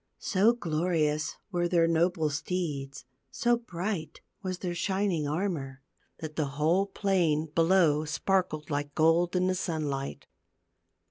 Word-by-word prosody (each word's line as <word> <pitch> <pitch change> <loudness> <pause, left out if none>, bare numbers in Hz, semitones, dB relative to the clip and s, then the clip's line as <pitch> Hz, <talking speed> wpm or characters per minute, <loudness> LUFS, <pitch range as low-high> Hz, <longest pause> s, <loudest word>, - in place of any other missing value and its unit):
So 210 +4 +3
glorious 155 -5 0 0.2
were 175 -2 +1
their 170 -1 +3
noble 165 -1 +1
steeds, 140 -4 -3 0.2
so 240 0 +2
bright 185 -6 -4 0.2
was 185 -2 -3
their 180 -1 -3
shining 190 -4 0
armor, 145 -5 -3 0.3
that 155 -1 -7
the 155 -3 0
whole 170 +6 +2
plain 180 -6 +1
below 165 -3 +3
sparkled 160 -1 -1
like 145 0 -2
gold 165 +3 +3
in 180 0 +2
the 185 - +2
sun 160 -5 -2
light. 135 0 -5
165 Hz, 130 wpm, -29 LUFS, 150-185 Hz, 0.3 s, So